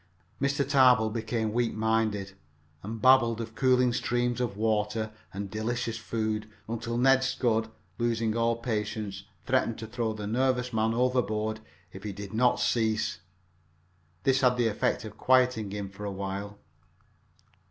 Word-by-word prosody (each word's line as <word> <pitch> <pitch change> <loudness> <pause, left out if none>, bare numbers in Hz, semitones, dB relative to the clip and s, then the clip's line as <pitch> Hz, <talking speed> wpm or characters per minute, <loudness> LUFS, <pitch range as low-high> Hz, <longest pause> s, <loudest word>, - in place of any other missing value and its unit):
Mr. 140 0 +1
Tarbill 125 -5 +5
became 110 -1 -2
weak 120 0 0
minded, 110 -3 0 0.5
and 110 +3 -6
babbled 120 -2 +5
of 115 -1 -5
cooling 125 0 +3
streams 120 0 0
of 115 -5 -2
water 110 0 0 0.2
and 100 +1 -5
delicious 115 +1 -2
food 110 -1 -2 0.2
until 115 +1 -3
Ned 135 +1 +4
Scudd, 115 -4 0 0.3
losing 115 -2 0
all 115 0 +2
patience, 105 -3 -3 0.2
threatened 125 -3 +1
to 110 - -6
throw 110 0 -2
the 105 -1 -6
nervous 125 +2 0
man 110 +1 +1
overboard 110 -3 0 0.3
if 95 - -9
he 105 -1 -5
did 100 +1 -8
not 125 +2 +3
cease. 110 -6 0 1.0
This 135 0 +3
had 125 -1 +4
the 120 -2 +2
effect 105 0 -1
of 105 - -10
quieting 125 -5 +3
him 100 0 -4
for 100 +1 -10
a 100 - -3
while. 100 +1 -5
115 Hz, 145 wpm, -28 LUFS, 110-125 Hz, 1.0 s, Tarbill